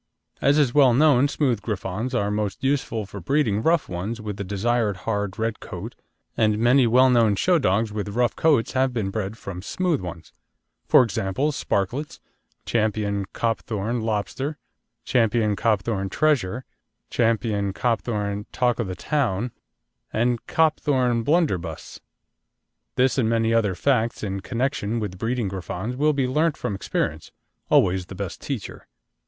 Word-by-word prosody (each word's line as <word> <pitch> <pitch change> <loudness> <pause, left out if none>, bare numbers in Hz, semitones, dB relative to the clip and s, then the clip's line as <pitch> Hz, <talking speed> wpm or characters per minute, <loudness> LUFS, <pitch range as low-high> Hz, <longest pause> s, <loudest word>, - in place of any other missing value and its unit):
As 140 +2 +4
is 140 -5 +3
well 135 -5 +5
known, 140 -1 +5
smooth 130 -7 0
Griffons 105 +4 -3
are 105 -4 0
most 105 +1 -2
useful 135 -6 0
for 100 +1 -9
breeding 110 - +1
rough 165 +4 +2
ones 95 +6 -4
with 105 -2 -5
the 100 - -3
desired 105 +1 0
hard 105 -3 -2
red 110 -1 -2
coat, - - -7 0.4
and 105 -2 +2
many 120 +3 +4
well 125 +3 +5
known 115 -4 +4
show 175 - +3
dogs 110 -2 +1
with 105 -1 -3
rough 120 +3 0
coats 150 -8 +2
have 130 -1 +1
been 100 -4 -1
bred 110 +1 -3
from 90 -5 -7
smooth 170 - -1
ones: 85 -2 -8 0.5
for - - +7
example, 115 +6 -1
Sparklets, 130 +3 -2 0.5
Ch. - - -7 0.6
Copthorne 115 0 -2
Lobster, 115 +7 -2 0.5
Ch. - - -7 0.4
Copthorne 105 -2 0
Treasure, 130 -3 +1 0.5
Ch. - - -8
Copthorne 105 -1 0
Talk 125 -2 +1
o' - - +1
the 95 -3 -5
Town, 120 -1 -1 0.6
and 120 +1 0
Copthorne 130 -7 +2
Blunderbuss. 110 - -1 1.0
This 130 +1 +2
and 110 -3 +2
many 115 0 +2
other 105 -5 +2
facts 120 +3 0
in 100 -2 -2
connection 120 0 -2
with 95 -4 -5
breeding 115 0 -1
Griffons 95 +4 -4
will 150 +3 +2
be 140 -2 +1
learnt 150 +4 +1
from - - -3
experience, 95 - -3 0.4
always 90 0 +3
the 95 - -9
best 95 -1 -5
teacher. 130 -9 -6
115 Hz, 145 wpm, -24 LUFS, 100-130 Hz, 1.0 s, for